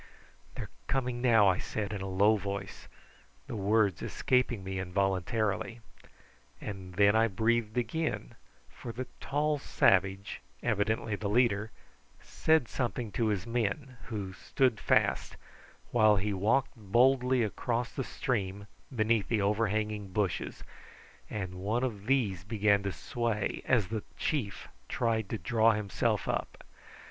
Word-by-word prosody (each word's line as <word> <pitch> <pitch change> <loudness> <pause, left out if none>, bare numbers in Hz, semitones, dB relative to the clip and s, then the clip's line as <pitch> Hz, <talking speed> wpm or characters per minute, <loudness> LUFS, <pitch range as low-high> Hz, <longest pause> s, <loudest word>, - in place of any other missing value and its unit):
"They're - - -6 0.2
coming 125 -2 -1
now," 115 -5 +5
I 95 -2 +3
said 105 -1 -3
in 100 - -4
a 95 - -4
low 100 +4 +4
voice, 100 -1 -5 0.6
the - - -6
words 105 -2 +2
escaping 125 -5 0
me 95 0 -4
involuntarily. 95 +4 -1 0.8
And 95 -3 -7
then 100 +2 +5
I 115 +1 +5
breathed 110 +2 0
again, 120 - -2 0.3
for 120 - -8
the 130 +3 -5
tall 150 +1 0
savage, 95 -5 +2 0.2
evidently 110 +1 0
the 100 0 -3
leader, 110 -2 +2 0.5
said 160 -6 +2
something 120 -3 -2
to 110 +4 0
his 100 -3 -1
men, 120 +3 -2
who 100 -4 -4
stood 125 +1 +1
fast, - - +1 0.5
while 110 -3 +5
he 100 +1 0
walked 115 +9 +1
boldly 125 +4 +3
across 115 +3 -2
the 135 - -2
stream 100 -6 -2 0.3
beneath 110 -3 +1
the 110 -4 +1
overhanging 105 0 0
bushes, 95 -1 -2 0.7
and 95 -4 -4
one 110 +6 0
of 105 -5 -3
these 110 -10 +1
began 100 -1 +2
to 100 0 -2
sway 115 -1 -2
as 110 -8 +2
the 110 -1 -2 0.2
chief 120 -11 -2 0.2
tried 110 -4 0
to 110 - -2
draw 115 +4 +3
himself 105 -2 -1
up. - - -3
110 Hz, 135 wpm, -30 LUFS, 100-120 Hz, 0.8 s, now